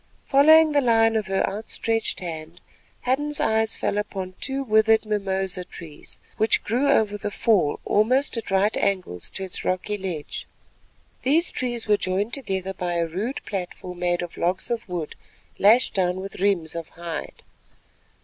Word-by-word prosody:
Following 310 +3 +6
the 290 -1 +3
line 225 -2 +4
of 215 -1 0
her 190 0 +1
outstretched 225 +2 -2
hand 165 -1 -7 0.4
Hadden's 290 +3 0
eyes 220 0 +1
fell 205 - 0
upon 190 -3 -4
two 275 0 -1
withered 220 -1 +4
mimosa 195 -3 -1
trees 165 -4 -10 0.2
which 220 - +3
grew 255 +6 +1
over 210 -6 +2
the 205 - -3
fall 205 -7 +2
almost 255 +8 +2
at 230 - -4
right 195 +2 +2
angles 180 - -1
to 190 - -6
its 185 - -5
rocky 185 -1 -2
edge. 150 - -8 0.7
These 315 +7 +2
trees 240 -3 -3
were 210 -1 +4
joined 195 +4 -1
together 190 -7 -3
by 175 -2 -3
a 170 -1 +1
rude 200 - -4
platform 180 -2 -5
made 175 0 0
of 175 - -8
logs 180 +7 -1
of 230 -4 -3
wood 170 -4 -4 0.5
lashed 220 +5 +5
down 180 -1 0
with 195 +1 -7
riems 185 -5 +1
of 165 -1 -5
hide. 170 -1 -7
200 Hz, 160 wpm, -24 LUFS, 180-225 Hz, 0.7 s, Following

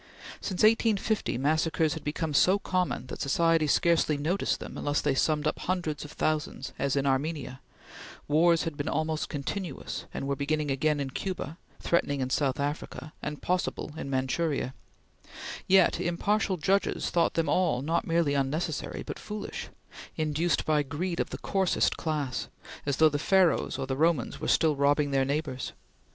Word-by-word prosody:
Since 190 -1 -2
1850, 220 - +2
massacres 160 +3 +1
had 160 - -7
become 150 +1 -2
so 185 +7 +5
common 185 -8 -1
that - - -7
society 165 +2 +3
scarcely 160 -1 +3
noticed 170 +7 0
them - - -8
unless 145 0 0
they 145 - +1
summed 150 +2 +1
up 155 - 0
hundreds 175 -5 -2
of 150 - -9
thousands, 150 -4 -2
as 140 0 +1
in 140 0 +1
Armenia; 135 0 -1 0.7
wars 165 +2 +4
had 165 -2 -3
been 145 +2 -3
almost 155 0 -1
continuous, 150 +2 -4
and 135 - -4
were 140 - 0
beginning 145 +1 -1
again 150 +2 +1
in 135 -2 -3
Cuba, 180 -1 -4 0.2
threatening 145 -4 +1
in 130 0 -2
South 135 -2 +1
Africa, 145 0 -4
and 150 0 -5
possible 180 -3 -1
in 160 - -5
Manchuria; 135 +1 -1 0.9
yet 190 -1 +5
impartial 190 +3 0
judges 195 +5 +1
thought 170 -1 +2
them 165 -1 +1
all 145 -5 +2
not 165 +3 0
merely 165 -3 +2
unnecessary, 145 +3 -2
but - - -6
foolish 210 -1 -6 0.5
induced 155 +2 +1
by 155 -1 +3
greed 165 +5 -3
of - - 0
the - - -5
coarsest 190 -2 +1
class, 150 -6 -2 0.4
as 140 - +1
though 160 - +7
the 145 -1 0
Pharaohs 185 -5 +3
or 135 - -2
the 130 0 -2
Romans 155 -4 +1
were - - -2
still 155 -2 +3
robbing 145 +1 +2
their 135 -1 +2
neighbors. 140 -2 -2
155 Hz, 165 wpm, -28 LUFS, 140-170 Hz, 0.9 s, though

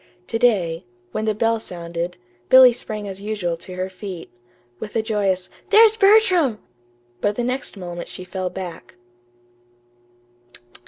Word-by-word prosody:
To 225 - -1
day, 185 -9 +2 0.3
when 215 - -2
the 215 -1 0
bell 225 +1 +1
sounded, 170 -2 -5 0.3
Billy 260 -1 +9
sprang 215 -3 -5
as 195 0 -7
usual 200 -5 -2
to 180 +2 -10
her 185 0 -2
feet, 185 -2 -8 0.5
with 210 - -8
a 225 - +1
joyous 195 -4 0 0.2
"There's 440 +1 +7
Bertram!" 390 - +4 0.6
But 205 0 0
the 245 - -2
next 250 -3 -3
moment 175 -2 -7
she 185 - -8
fell 185 0 -4
back. 175 -10 -8
205 Hz, 140 wpm, -21 LUFS, 180-235 Hz, 0.6 s, Billy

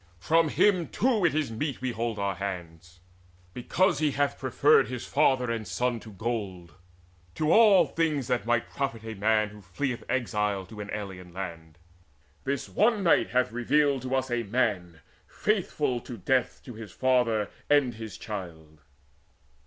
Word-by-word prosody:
From 160 - +2
him 185 0 +3
too 225 -6 +1
is 155 -6 +1
it - - -6
meet 140 0 -2
we 130 -1 -2
hold 115 -1 -3
our 100 -1 -1
hands 90 -2 -7 0.5
Because 180 +10 +1
he 155 -1 +2
hath 145 0 0
preferred 135 +3 +4
his 125 -2 -5
father 130 -4 +2
and 115 -2 -3
son 125 -1 -1
To 110 - -12
gold, 100 -5 -4 0.6
to 155 0 +1
all 205 -6 +7
things 155 -3 -1
that 125 0 0
might 120 -1 +1
profit 125 -5 -3
a 110 0 -6
man 110 +1 +1
Who 105 0 -13
fleeth 120 +7 -3
exiled 105 -6 -1
to 110 -1 -10
an 105 - -7
alien 95 -4 -7
land. 85 -4 -7 0.7
This 140 0 -2
one 215 -1 +2
night 170 - +3
hath 125 -1 +1
revealed 135 +3 +2
to 130 +1 -2
us 130 -1 -1
a 120 -1 +1
man 100 -7 -1 0.3
Faithful 160 - -1
to 120 0 -9
death 125 +6 0
to 125 - -8
his 110 -3 -9
father 125 -4 +1 0.2
and 145 -4 +4
his 110 -4 -8
child." 80 -7 -8
120 Hz, 160 wpm, -27 LUFS, 100-140 Hz, 0.7 s, all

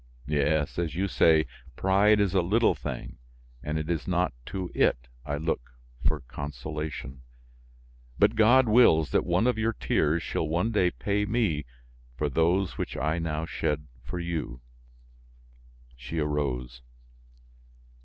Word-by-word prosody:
Yes, 75 +2 0
as 80 -4 -2
you 95 +3 0
say, 80 -3 +4 0.3
pride 100 +3 +4
is 100 -3 +1
a 95 - +4
little 110 +7 +3
thing - - -7 0.4
and 75 +1 -3
it 80 -1 -3
is 85 -3 -2
not 90 -3 +1
to 95 -2 -4
it - - +3 0.3
I 70 0 -1
look 75 -6 -3 0.3
for 75 -2 0
consolation; 75 0 -6 1.0
but - - +4
God 120 +4 +5
wills 80 - +5
that - - +2
one 115 - +2
of 125 -3 +1
your 115 +1 +1
tears 80 -4 0
shall 80 - -2
one 90 +9 0
day 95 -5 +3
pay 105 +3 -1
me 100 - 0 0.5
for 75 - 0
those 85 +5 +1
which - - -3
I 80 +5 0
now 80 -1 -2
shed 75 -2 -2 0.2
for 85 +8 -5
you!" 80 -8 -4 1.3
She 60 +6 -7
arose. 65 -5 -2
80 Hz, 140 wpm, -27 LUFS, 75-95 Hz, 1.3 s, God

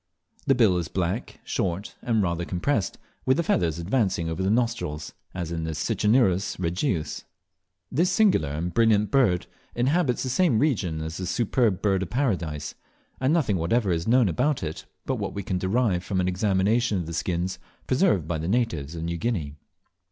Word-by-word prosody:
The 135 - +5
bill 110 -7 +4
is 85 - -3
black, 90 +6 -3
short, 95 -2 -2
and 110 -4 +1
rather 85 -1 -1
compressed, 95 +4 -1 0.3
with 130 +2 +3
the 170 - +1
feathers 85 - +1
advancing 85 -3 0
over 80 +3 -3
the 95 - +1
nostrils, 110 -10 -1 0.2
as 85 -3 -4
in 80 -1 -3
Cicinnurus 100 - +2
regius. 90 - -1 0.7
This 170 +6 +2
singular 185 - +3
and 80 +5 -3
brilliant 110 -3 +3
bird 115 -11 +3 0.3
inhabits 130 +1 +1
the 130 - -2
same 130 -2 +3
region 95 - 0
as 80 +1 -5
the 90 - -4
Superb 110 -1 +1
Bird 95 -2 +2
of 95 - -3
Paradise, 85 - -1 0.5
and 130 +2 +2
nothing 155 - +2
whatever 95 +5 +1
is 85 0 -1
known 120 -1 +5
about 135 - 0
it 80 -1 -5 0.2
but - - -1
what - - -4
we 100 - -3
can 90 -1 -2
derive 95 -1 +1
from 95 0 -1
an 90 - +1
examination 100 +4 +1
of 90 - -2
the 85 - -6
skins 90 +2 -2 0.3
preserved 130 - +2
by 85 -2 -2
the 80 - -3
natives 85 - -1
of 80 - -5
New 85 0 -2
Guinea. 85 -8 -2
95 Hz, 175 wpm, -25 LUFS, 85-120 Hz, 0.7 s, The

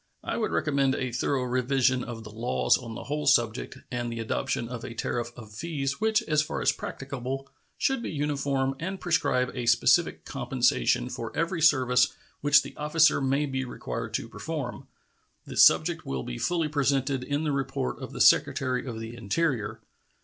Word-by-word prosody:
I - - -2
would 220 - 0
recommend 140 -3 +1
a 130 -1 -2
thorough 130 +2 0
revision 130 0 +1
of 115 -2 -7
the 110 - -10
laws 115 +3 +2
on 115 -3 -6
the - - -6
whole 150 +1 -3
subject 120 -4 +2
and 120 -1 -2
the 115 - -5
adoption 115 +1 -2
of 120 -1 -6
a 115 -3 -7
tariff 120 +1 -2
of 110 -3 -11
fees 140 - -3
which, 220 -1 +2
as 150 -1 +2
far 150 - -3
as - - +3
practicable, 135 0 -5 0.3
should 270 -3 +1
be - - -4
uniform, 140 -2 -1
and 190 +4 -4
prescribe 125 -7 +1
a 125 -3 -4
specific - - +3
compensation - - +1
for - - -5
every 170 +1 0
service 130 -3 +4 0.2
which 145 0 +5
the - - -10
officer 150 +1 +3
may 135 +2 +1
be 130 -1 -2
required 125 - -5
to - - -2
perform. 130 +4 -5 0.6
This - - +4
subject 165 0 +4
will 65 -2 -3
be - - -6
fully 170 -3 0
presented 140 -2 0
in 145 +3 -1
the 150 - 0
report 135 -1 -2
of - - -6
the - - -4
Secretary 130 -1 +3
of 115 -3 -5
the 115 +1 -7
Interior. 120 +1 -1
135 Hz, 180 wpm, -27 LUFS, 120-150 Hz, 0.6 s, which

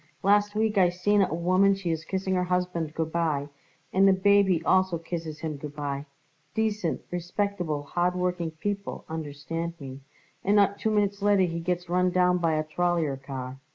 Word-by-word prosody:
"Last 205 +1 +3
week 215 -1 +2
I 180 -2 +5
seen 200 +4 +2
it 190 - +2
a - - -2
woman 185 +3 +3
she 190 -3 -3
is 160 -1 -2
kissing 190 +1 -2
her 180 -1 +1
husband 180 -3 -1
good 160 -1 -2
bye, 155 -4 0 0.4
and 195 +1 +5
the 195 - +6
baby 190 -3 +3
also 185 -2 +3
kisses 165 -2 -6
him 155 -2 -3
good 145 +1 -8
bye 145 -1 -4 0.5
decent, 210 -6 0
respectable, 175 -3 -2
hard 175 +4 0
working 180 -2 -1
people, 200 +5 -4
understand 160 +2 -5
me 135 -2 -8 0.4
and 200 +2 +3
not 200 -1 +3
two 220 - 0
minutes 205 -1 +1
later 205 -1 +4
he 170 -2 -1
gets 180 +1 -2
run 180 +1 +2
down 180 0 +3
by 165 -2 +1
a 155 - 0
trollyer 165 -2 0
car. 135 -1 -7
175 Hz, 185 wpm, -27 LUFS, 160-195 Hz, 0.5 s, the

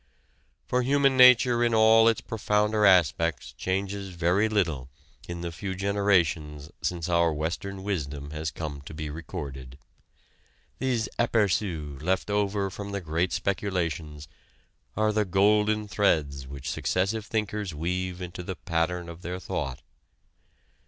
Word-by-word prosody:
For 125 - +1
human 135 +1 +3
nature 125 -1 +7
in 120 -1 +2
all 110 +1 +6
its 115 - +2
profounder 105 -1 +1
aspects 85 -4 +2
changes 95 0 -3
very 90 +6 +2
little 80 -12 0 0.4
in 85 0 -5
the 85 -1 -4
few 95 +3 -5
generations 85 -7 0
since 85 -2 -2
our 85 -1 +3
Western 85 +6 -4
wisdom 75 -7 -4
has 80 0 -3
come 75 -3 -6
to - - -8
be 75 -1 -5
recorded. 70 -5 -7 1.0
These 120 -4 0
aperçus 95 - 0
left 95 +4 0
over 100 -1 0
from 100 +1 -7
the 100 - -2
great 85 +2 -1
speculations 85 -6 -2 0.7
are 110 0 +2
the 105 0 +2
golden 105 +2 +2
threads 75 -10 0
which 70 0 -6
successive 105 +4 -1
thinkers 105 -5 -2
weave 90 +3 -3
into 90 +1 -7
the 90 +1 -5
pattern 85 +5 -1
of 85 +1 -9
their 90 +1 -5
thought. 65 -7 -4
90 Hz, 130 wpm, -27 LUFS, 80-105 Hz, 1.0 s, nature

